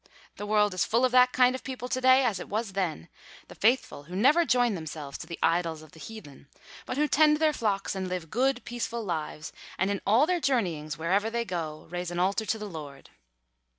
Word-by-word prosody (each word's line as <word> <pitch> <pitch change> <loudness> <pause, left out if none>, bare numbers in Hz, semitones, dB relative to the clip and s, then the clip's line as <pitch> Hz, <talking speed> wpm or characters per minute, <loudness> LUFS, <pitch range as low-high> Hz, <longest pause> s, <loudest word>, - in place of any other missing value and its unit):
The 205 - -6
world 210 -1 +3
is 185 - +1
full 235 +3 +2
of 255 - +1
that 250 0 +6
kind 250 0 +4
of 260 - -6
people 255 -2 -5
to 255 +1 -2
day 260 +1 +5
as 210 -6 0
it - - -8
was 215 -1 -2
then, 170 - -2 0.4
the - - -10
faithful 220 - +1
who 180 +4 -8
never 290 - +4
join 245 -5 +2
themselves 155 -5 -6
to - - -8
the 170 - -6
idols 165 -2 +1
of 155 - -16
the 160 - -16
heathen, 150 -10 -11 0.4
but 255 - -3
who 300 +1 +2
tend 300 +1 +4
their 310 0 +2
flocks 210 -7 -1
and 190 -1 -3
live 180 -3 -5
good 255 0 +1
peaceful 235 -1 -4
lives, 155 -4 -4 0.2
and 190 +2 +1
in 200 - -2
all 225 +8 +4
their 360 +1 0
journeyings, 175 - -1
wherever 190 +7 +1
they 235 +1 -2
go, 165 -6 -5
raise 175 0 -3
an 175 - -5
altar 195 +4 0
to 225 - 0
the 210 - -6
Lord. 150 -7 -9
205 Hz, 220 wpm, -28 LUFS, 170-250 Hz, 0.4 s, that